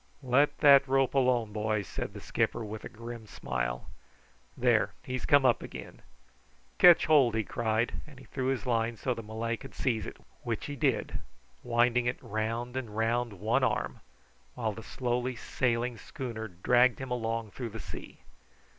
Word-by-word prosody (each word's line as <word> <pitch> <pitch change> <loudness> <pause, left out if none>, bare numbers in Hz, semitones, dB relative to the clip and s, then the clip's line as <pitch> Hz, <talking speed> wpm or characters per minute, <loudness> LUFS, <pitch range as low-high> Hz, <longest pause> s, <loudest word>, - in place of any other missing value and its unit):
"Let 140 +3 +3
that 140 -2 +7
rope 135 0 +2
alone, 125 -5 +2
boy," 105 -1 0
said - - -5
the - - -8
skipper 115 - -1
with 105 +1 -7
a - - -6
grim 115 0 -9
smile. - - -3 0.7
"There, - - +2
he's 130 -1 -4
come 145 -2 +5
up 120 -3 +4
again. - - -9 0.8
Ketch 175 -2 +8
hold!" 140 -7 +5
he 110 - +1
cried, 110 +1 -1
and 145 -3 -14
he 130 - -13
threw 130 -2 -3
his 135 -1 -1
line 115 -1 0
so 130 - -2
that 115 - -2
the 105 - -15
Malay 115 +1 -2
could 135 - -12
seize 115 -4 -1
it, - - -8 0.2
which 115 -3 -3
he 145 - -5
did, 130 - 0 0.4
winding 120 +1 +2
it 120 - 0
round 115 +4 -3
and 115 -5 -5
round 115 0 +1
one 110 +8 0
arm, 120 -4 0 0.6
while 115 -3 -1
the 110 - -8
slowly 125 +2 -2
sailing 120 0 -1
schooner 115 -4 -6
dragged 120 +7 +3
him 130 -1 -6
along 115 -2 -2
through 120 +1 -5
the 110 +1 -8
sea. - - -9
120 Hz, 170 wpm, -30 LUFS, 110-130 Hz, 0.8 s, Ketch